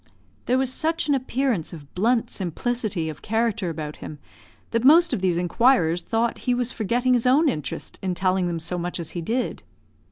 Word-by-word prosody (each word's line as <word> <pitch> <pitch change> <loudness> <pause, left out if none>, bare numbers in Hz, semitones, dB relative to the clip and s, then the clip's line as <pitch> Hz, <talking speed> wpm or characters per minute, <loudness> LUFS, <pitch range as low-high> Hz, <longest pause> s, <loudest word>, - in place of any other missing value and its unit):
There 250 - +3
was 260 -1 +1
such 325 +2 0
an 290 - +3
appearance 260 - -1
of 145 -4 -12
blunt 230 +5 +1
simplicity 200 -1 -2
of 155 -2 -7
character 225 -3 0
about 155 -2 -6
him, 150 - -8 0.5
that 230 0 0
most 335 +5 +6
of - - -1
these 180 -3 +1
inquirers 175 -2 +3
thought 230 +3 -1
he 245 - +3
was 245 0 -1
forgetting 245 +3 +1
his 245 0 +2
own 290 +6 +4
interest 150 - -4
in 185 -2 -2
telling 185 0 +1
them 170 -1 -2
so 175 +2 -3
much 175 +1 -4
as 165 - -5
he 175 - -4
did. 235 +9 -2
225 Hz, 190 wpm, -24 LUFS, 175-250 Hz, 0.5 s, most